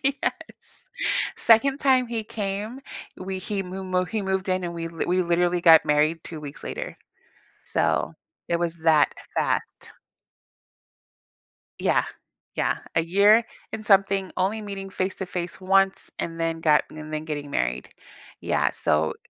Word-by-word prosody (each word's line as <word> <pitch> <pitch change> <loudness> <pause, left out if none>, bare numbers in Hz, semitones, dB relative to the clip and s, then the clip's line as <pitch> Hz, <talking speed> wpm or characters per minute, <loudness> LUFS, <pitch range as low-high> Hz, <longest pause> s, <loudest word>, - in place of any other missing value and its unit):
Yes. 275 +1 -3 0.5
2nd 270 +5 +4
time 260 -3 +3
he 225 -2 -3
came, 210 +4 -4 0.4
we 190 0 -5
he 195 +1 -3
moo 190 +1 -6
mo 185 0 0
he 215 +2 -3
moved 190 0 -1
in, 185 -1 0
and 170 0 -4
we 165 0 -4
lit 165 0 -4
we 185 +1 +3
literally 175 0 +1
got 165 -2 +7
married 150 +2 +2
2 160 -2 -7
weeks 145 -1 -8
later. - - -5 0.7
So - - 0 0.3
it 170 - +1
was 170 -1 -1
that 155 -3 +4 0.2
fat. - - +2 2.2
Yeah. - - +2 0.5
Yeah, - - +1 0.2
a - - +5
year 205 +6 +5 0.3
and 215 -1 -5
something, 195 -1 +3
only 195 +4 0
meeting 195 -2 -6
face 185 0 -2
to 190 - -4
face 180 0 -5
once, 195 +1 +2
and 165 0 -4
then 165 0 -1
got 150 -2 +4
and 155 0 -7
then 155 +1 -3
getting 145 -2 -4
married. 60 - -1 0.5
Yeah, - - +1
so 80 +1 +1
185 Hz, 150 wpm, -25 LUFS, 165-200 Hz, 2.2 s, got